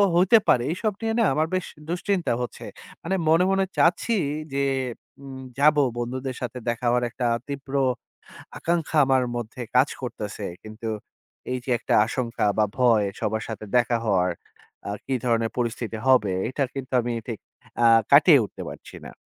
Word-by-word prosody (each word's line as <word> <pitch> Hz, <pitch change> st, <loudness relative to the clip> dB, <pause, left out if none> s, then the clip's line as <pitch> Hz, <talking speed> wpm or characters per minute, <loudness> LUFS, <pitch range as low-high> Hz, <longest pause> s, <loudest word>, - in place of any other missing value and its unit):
হইতে 185 Hz, +6 st, +6 dB
পারে, 120 Hz, -, +4 dB
এইসব 205 Hz, +4 st, -1 dB
নিয়ে 225 Hz, 0 st, -1 dB
না -, -, +4 dB
আমার 155 Hz, +3 st, +1 dB
বেশ 185 Hz, -, -1 dB, 0.2 s
দুশ্চিন্তা 180 Hz, -, 0 dB
হচ্ছে। 125 Hz, -, -6 dB, 0.4 s
মানে 190 Hz, +4 st, -1 dB
মনে, 165 Hz, +3 st, +5 dB
মনে 195 Hz, 0 st, +2 dB
চাচ্ছি 180 Hz, +7 st, +3 dB, 0.4 s
যে, 140 Hz, -, 0 dB, 0.6 s
উম 135 Hz, -1 st, -8 dB, 0.2 s
যাবো, 150 Hz, 0 st, +5 dB, 0.2 s
বন্ধুদের 130 Hz, +2 st, -3 dB
সাথে 125 Hz, 0 st, -4 dB
দেখা 120 Hz, +1 st, -3 dB
হওয়ার 125 Hz, +1 st, +2 dB
একটা 125 Hz, +1 st, -3 dB, 0.2 s
তীব্র 140 Hz, -1 st, -7 dB, 0.8 s
আকাঙ্খা 165 Hz, -2 st, -1 dB
আমার 130 Hz, -1 st, +3 dB
মধ্যে 120 Hz, +1 st, -5 dB
কাজ 130 Hz, +3 st, +5 dB
করতেছে। 105 Hz, -4 st, -5 dB, 0.2 s
কিন্তু 110 Hz, +1 st, -8 dB, 0.6 s
এই 130 Hz, -, 0 dB
যে, -, -, -6 dB
একটা -, -, -2 dB
আশঙ্কা 115 Hz, -1 st, -2 dB
বা 110 Hz, -, +4 dB
ভয় 115 Hz, -5 st, +4 dB
সবার 110 Hz, +1 st, -1 dB
সাথে 110 Hz, -1 st, -6 dB
দেখা 120 Hz, -1 st, +2 dB
হওয়ার, 90 Hz, -4 st, +2 dB, 0.6 s
আ -, -, -3 dB, 0.2 s
কি 135 Hz, -, -2 dB
ধরনের 115 Hz, -2 st, +1 dB
পরিস্থিতি 115 Hz, -2 st, -2 dB
হবে, 110 Hz, -7 st, +4 dB, 0.2 s
এটা 140 Hz, +2 st, -1 dB
কিন্তু 135 Hz, -2 st, -6 dB
আমি 120 Hz, +1 st, -3 dB, 0.2 s
ঠিক 115 Hz, -4 st, -5 dB, 0.4 s
আ -, -, +6 dB, 0.3 s
কাটিয়ে 145 Hz, +1 st, +8 dB
উঠতে -, -, -9 dB
পারছি -, -, -11 dB
না। -, -, -8 dB
130 Hz, 160 wpm, -24 LUFS, 115-155 Hz, 0.8 s, কাটিয়ে